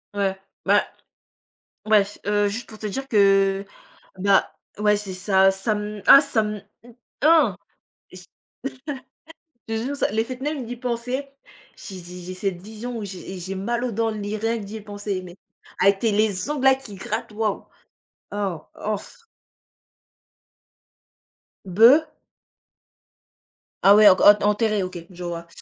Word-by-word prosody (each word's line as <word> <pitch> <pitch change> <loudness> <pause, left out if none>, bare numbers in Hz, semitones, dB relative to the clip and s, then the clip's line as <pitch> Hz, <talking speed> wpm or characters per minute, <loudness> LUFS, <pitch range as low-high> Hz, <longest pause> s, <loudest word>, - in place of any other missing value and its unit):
Ouais, 195 -1 0 0.3
bah, - - +4 1.0
bref. 210 -1 +2
Heu, 205 0 +2
juste 225 +4 -5
pour 215 - -12
te 215 - -7
dire 270 +6 -5
que, 195 -2 +3 0.5
bah 195 0 +2 0.2
ouais 210 0 +3
c'est 200 -2 -5
ça. 190 +1 +3
Ça 195 +3 -1
me, 210 0 -5
ah 275 - +10
ça 280 -6 0
me, 210 -1 -4 0.2
mmh, 240 - -15 0.3
ah! 325 +1 +5 0.6
J - - -12 1.4
je 225 - -2
te - - -3
jure, 285 +1 -3
ça 240 - 0
le 220 - +1
fait 255 +1 -8
même 290 -4 -3
d'y 245 - -6
penser, 250 +3 -3 0.5
j'ai 190 -3 -9
j'ai 180 +1 -10
j'ai 185 +1 -7
cette 185 -2 -3
vision 220 +4 -7
où, 215 - -5
j'ai 190 -1 -8
et - - -7
j'ai 185 +2 -5
mal 235 +5 -2
aux 240 - -2
dents 225 +1 0
li 210 0 -4
rien 225 +2 -1
que 210 - -7
d'y 215 +2 -8
penser 205 -2 -5
mais, 175 -1 -12 0.4
avec 195 0 +4
tes 225 -3 +1
les 210 +2 0
ongles 290 -3 -2
là 265 0 +7
qui 260 -7 -11
grattent, 190 - -5
waouh! 215 -1 -2 0.7
Oh, 195 -5 -3
oh 215 0 -2
f 465 - -15 2.4
Be 225 - +6 1.8
Ah 200 +1 +7
ouais, 210 -1 +8
o 185 - +6
q - - -1
o 205 - +10
t 210 - -7
enterré, 210 -1 +1
OK. 180 -2 -7
Je 180 -1 -10
vois. 170 -1 -5
210 Hz, 165 wpm, -23 LUFS, 195-230 Hz, 2.4 s, ah